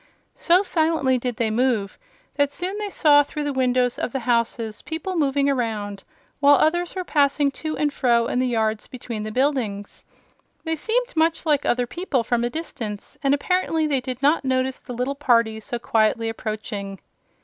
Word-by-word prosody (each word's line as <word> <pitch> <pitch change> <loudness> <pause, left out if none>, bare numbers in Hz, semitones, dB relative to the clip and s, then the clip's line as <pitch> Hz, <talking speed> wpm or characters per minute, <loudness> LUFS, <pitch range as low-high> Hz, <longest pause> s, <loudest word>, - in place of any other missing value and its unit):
So 355 +3 +3
silently 315 -8 +1
did 245 -1 -3
they 220 -1 0
move 225 -4 0 0.3
that 285 -1 +1
soon 360 +6 -4
they 420 -1 -3
saw 295 -6 +5
through 295 +1 -4
the 290 -1 -2
windows 250 -1 +1
of - - -3
the 270 - -2
houses, 230 -2 -1
people 335 +4 -4
moving 280 -3 +1
around, 215 -7 -2 0.4
while 285 0 +6
others 345 +5 +1
were 370 - -2
passing 285 -3 +2
to 310 -1 -3
and 295 -1 0
fro 235 -3 +2
in 250 - -1
the 255 - +1
yards 220 -2 -1
between 235 -3 -6
the 215 0 -5
buildings. 240 -6 -1 0.6
They 320 -1 -1
seemed 475 +9 -1
much 325 +1 +1
like 295 -3 +2
other 245 0 +2
people 285 -3 -2
from 235 +1 0
a 240 - 0
distance, 240 -9 -6
and 280 0 +3
apparently 325 0 0
they 280 -4 0
did 255 +1 -6
not 295 +3 +3
notice 260 0 0
the 245 - -9
little 250 +3 -2
party 235 -6 +2
so 240 +2 -5
quietly 225 0 +1
approaching. 215 -3 -5
260 Hz, 180 wpm, -23 LUFS, 230-300 Hz, 0.6 s, while